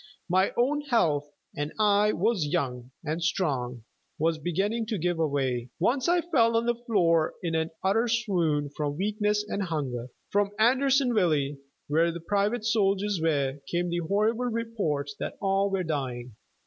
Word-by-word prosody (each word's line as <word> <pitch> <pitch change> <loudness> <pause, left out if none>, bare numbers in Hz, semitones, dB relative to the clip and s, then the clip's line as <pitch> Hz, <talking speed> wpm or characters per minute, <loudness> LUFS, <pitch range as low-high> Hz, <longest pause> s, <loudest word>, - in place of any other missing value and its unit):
My 185 +2 +2
own 280 +5 +2
health 165 - +1 0.3
and 145 +1 -3
I 210 0 +4
was 195 -4 +1
young 125 -3 -2 0.2
and 160 +3 -2
strong 130 - -1 0.3
was 160 +1 +1
beginning 200 +8 -1
to 215 - -1
give 175 0 0
way. 135 -6 0
Once 255 - +1
I 350 0 +3
fell 235 -10 +2
on 230 - +1
the 240 - +2
floor 185 -10 +1
in 170 -2 -1
an 160 0 0
utter 215 +5 +2
swoon 175 -11 0
from 145 -1 -2
weakness 210 +2 0
and 205 - -2
hunger. 140 -9 -3 0.2
From 205 0 +1
Andersonville, 230 - +3 0.3
where 165 +3 +2
the 170 - -6
private 205 +6 0
soldiers 205 -3 +1
were, 145 -4 0
came 175 0 0
the 175 - 0
horrible 210 +8 +1
reports 220 -12 -2
that - - -4
"all 195 0 +1
were 195 -1 -1
dying." 125 -7 -4
185 Hz, 155 wpm, -27 LUFS, 150-220 Hz, 0.3 s, I